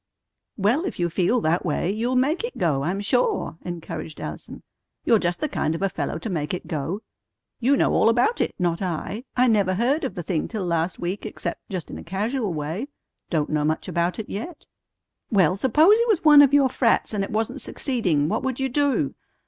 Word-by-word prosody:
"Well, 225 - +2
if 375 - -5
you 175 -1 0
feel 195 +8 +2
that 165 +1 +1
way, 170 +4 0
you'll 235 +5 -1
make 290 - +1
it 475 - -5
go, 150 -6 +1
I'm 180 +7 -1
sure," 210 - 0
encouraged 170 -3 -6
Allison. - - -8 0.4
"You're 230 -3 +5
just 175 -1 -1
the 305 - 0
kind 165 - -1
of 165 - -4
a 195 - +2
fellow - - -3
to - - -6
make 165 -4 -2
it 180 - -8
go. 165 +7 -3 0.6
You 270 +4 +3
know - - +2
all - - +4
about 245 - +2
it. - - -1
Not 175 -1 0
I. 190 - -3
I 250 - +5
never 200 -5 +2
heard 255 - +1
of 265 - -3
the 175 - -4
thing 160 -1 -1
till 215 -5 -4
last 170 0 -1
week, 180 +3 -4
except - - -6
just 185 -5 -5
in - - -7
a - - -9
casual 210 +5 -2
way. 160 - -3 0.4
Don't 155 -4 0
know 150 -1 +1
much 155 +1 -1
about 170 +1 0
it 220 - -5
yet." 295 - -6 0.6
"Well, 185 -6 +3
s'pose 310 - +5
it 470 - +2
was 390 -8 +1
one 295 -1 +9
of 280 -2 +6
your 285 -1 +5
frats, 235 -3 +1
and 200 -2 0
it - - -4
wasn't 225 +5 -2
succeeding. 180 - 0
What - - -1
would 260 -1 -3
you 265 0 0
do? 260 - +1
200 Hz, 215 wpm, -24 LUFS, 170-255 Hz, 0.6 s, one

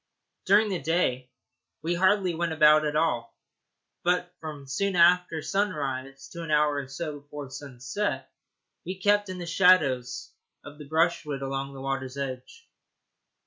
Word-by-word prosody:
During 210 +3 +5
the 185 -3 -2
day 135 -5 0 0.5
we 170 +2 0
hardly 185 0 +2
went 165 0 -1
about 155 0 +6
at 150 - -3
all, 120 -8 0 0.7
but 180 0 0
from 150 -3 -8
soon 190 +8 -1
after 175 -2 +4
sunrise 135 -9 -2
to 170 - -8
an 165 - -6
hour 150 -1 +3
or 140 -2 -4
so 145 +2 -5
before 145 -1 -9
sunset 135 +9 -4 0.6
we 185 +1 -5
kept 205 +1 +2
in 185 - -5
the 175 - -5
shadow 170 -7 +4 0.6
of 145 +1 -11
the 150 - -10
brushwood 160 -3 0
along 135 0 -4
the 135 - -8
water's 135 0 -3
edge. 130 -2 -6
155 Hz, 145 wpm, -27 LUFS, 135-180 Hz, 0.7 s, about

